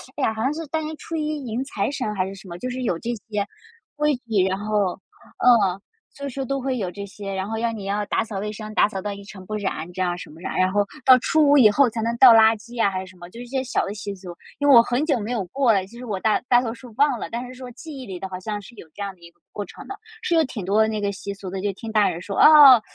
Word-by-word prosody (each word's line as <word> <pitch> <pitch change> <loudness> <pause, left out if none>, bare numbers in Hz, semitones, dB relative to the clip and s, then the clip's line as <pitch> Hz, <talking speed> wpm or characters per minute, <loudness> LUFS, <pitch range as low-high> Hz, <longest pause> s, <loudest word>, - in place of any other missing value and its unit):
哎 280 - -3
呀， 220 - +2
好 220 - -5
像 270 +4 +1
是 325 +1 -5
大 320 +3 -1
年 310 0 -5
初 330 - -7
一 305 -2 -2
迎 235 +3 -2
财 215 -6 -2
神 255 -7 -3
还 185 -1 0
是 195 - -7
什 195 0 -13
么， 170 -1 -7
就 255 - -4
是 255 +1 -4
有 180 -8 -1
这 235 - -5 0.2
些 205 -2 -1 0.5
规 300 -1 +2
矩。 225 -6 0
然 190 0 -1
后 210 -3 0 0.5
嗯， 205 -7 +4 0.4
就 280 0 -6
是 270 +1 -4
都 275 +1 -2
会 260 0 -1
有 190 -6 -3
这 200 +2 -7
些， 195 0 -7
然 190 0 -3
后 225 - -3
要 230 +1 0
你 215 -3 -7
要 205 +1 -1
打 - - 0
扫 210 -3 -5
卫 210 +1 -3
生， 215 0 -8
打 - - +4
扫 195 -3 -5
到 205 +1 -4
一 200 0 -10
尘 190 -2 -11
不 215 - -4
染， 190 -5 -3
这 185 - -4
样 175 -1 0
什 - - -9
么 160 +2 -14
着。 - - -5
然 185 0 +1
后 205 +1 +2 0.2
到 255 -1 +9
初 310 +3 +3
五 290 - +6
以 235 -6 +8
后 260 +4 +4
才 225 0 -4
能 230 +1 -1
倒 255 -1 +9
垃 225 0 +6
圾 235 +3 -13
呀， 225 -4 +3
还 185 - -3
是 190 - -7
什 185 - -17
么， 175 0 -11
就 230 - -12
是 - - -6
一 - - -10
些 260 +1 -2
小 255 - -1
的 200 - -5
习 205 -1 -6
俗。 180 -2 -10 0.2
因 285 - +1
为 275 - +8
我 235 - +10
很 245 +5 0
久 285 -6 +1
没 215 +3 -4
有 230 -5 -1
过 260 +5 +2
了， 190 -2 +1
其 235 - -14
实 250 - -8
我 205 -5 -3
大 215 +2 +2
大 245 0 +6
多 230 -2 -3
数 240 -1 -13
忘 285 -4 +3
了， - - -5
但 240 +2 -4
是 250 - -10
说 255 -1 -9
记 290 +4 -10
忆 260 - -8
里 185 -4 -7
的 190 - -5
好 185 -1 -6
像 205 +2 -4
是 235 +4 -14
有 170 - -12
这 205 - -10
样 200 -1 -4
的 175 - -30
一 170 0 -14
个 175 - -41
过 205 - -5
程 - - -12
的。 395 - -6 0.3
是 345 - 0
有 325 - +5
挺 225 -6 -6
多 205 +3 +3
的 220 - +4
那 215 -1 -2
个 200 - 0
习 200 0 -6
俗 195 -1 -8
的， 190 +1 -4
就 205 +1 0
听 220 +3 -8
大 215 -2 +3
人 170 - -5
说， 195 +2 -6
哦， 285 -6 +9
220 Hz, 345 characters per minute, -23 LUFS, 195-255 Hz, 0.5 s, 我